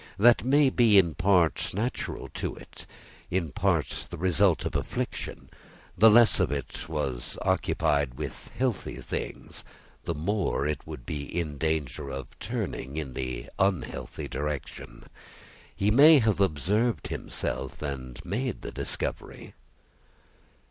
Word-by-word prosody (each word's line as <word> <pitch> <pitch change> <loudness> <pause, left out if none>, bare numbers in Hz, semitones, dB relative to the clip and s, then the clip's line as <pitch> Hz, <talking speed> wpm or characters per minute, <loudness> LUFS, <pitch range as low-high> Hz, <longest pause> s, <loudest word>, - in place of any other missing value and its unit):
That 120 +1 +6
may 140 +2 +4
be, 115 -5 +5
in 85 -4 +5
part, 90 -1 +2
natural 115 +5 -3
to - - -4
it; - - -13 0.4
in 85 -5 -1
part, - - 0
the 85 - -7
result 90 -2 +3
of - - -3
affliction. - - -3 0.5
The 110 +4 +7
less 115 0 +6
it 70 -4 -2
was 70 -6 -3
occupied 70 -5 +1
with 75 0 -7
healthy 125 -3 -1
things, - - -6 0.4
the 85 - -2
more 85 -2 0
it 75 +1 -3
would 75 -6 -8
be 70 +1 -4
in 75 -3 -4
danger 75 -4 -1
of 65 -1 -5
turning 70 +3 -4
in 70 -5 -4
the 65 -2 -4
unhealthy 95 -9 -1
direction. 70 -4 -5 0.7
He 105 +2 +2
may 150 +7 +8
have 110 -6 +2
observed 100 - +1
himself, 65 +1 -4
and 65 -3 -5
made 120 +7 -3
the - - -5
discovery." - - -5
80 Hz, 125 wpm, -28 LUFS, 70-105 Hz, 0.7 s, may